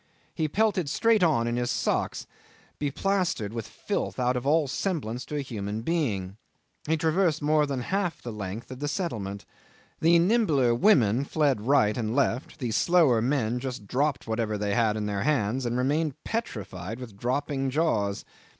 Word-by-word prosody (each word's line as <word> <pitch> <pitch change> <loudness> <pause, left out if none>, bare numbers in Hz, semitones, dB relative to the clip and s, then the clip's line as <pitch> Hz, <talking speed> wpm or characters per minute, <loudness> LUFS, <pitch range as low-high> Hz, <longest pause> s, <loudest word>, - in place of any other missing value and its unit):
He 155 - 0
pelted 190 -2 +1
straight 225 +5 +3
on 150 -10 +3
in 120 0 -1
his 120 0 -1
socks, - - -1 0.5
beplastered 150 - -1
with 115 -2 -4
filth - - -3
out 125 0 +1
of 125 +2 -2
all 155 0 +3
semblance 130 - -2
to 150 - -6
a 145 - 0
human 105 -3 -4
being. 110 - -1 0.5
He 160 +1 +2
traversed 160 0 +1
more 150 0 +3
than 135 -3 -2
half 185 +4 -1
the 120 - -6
length 105 +3 -6
of 130 - -7
the 145 - -2
settlement. 110 - -3 0.5
The 170 +1 +5
nimbler 170 - +3
women 120 - +4
fled 140 -5 +1
right 110 -7 +4
and 115 -1 -2
left, 130 -2 0
the 125 -6 -3
slower 155 -5 +4
men 125 -2 0
just 125 -4 -5
dropped 135 +5 0
whatever 110 -1 -1
they 100 0 -1
had 110 -1 +2
in 105 - -2
their 100 -1 -2
hands, 130 -3 0
and 120 +1 -1
remained 145 +3 0
petrified 105 - -4
with 120 -5 -9
dropping 135 +4 -1
jaws. 120 -9 0
130 Hz, 170 wpm, -27 LUFS, 110-155 Hz, 0.5 s, The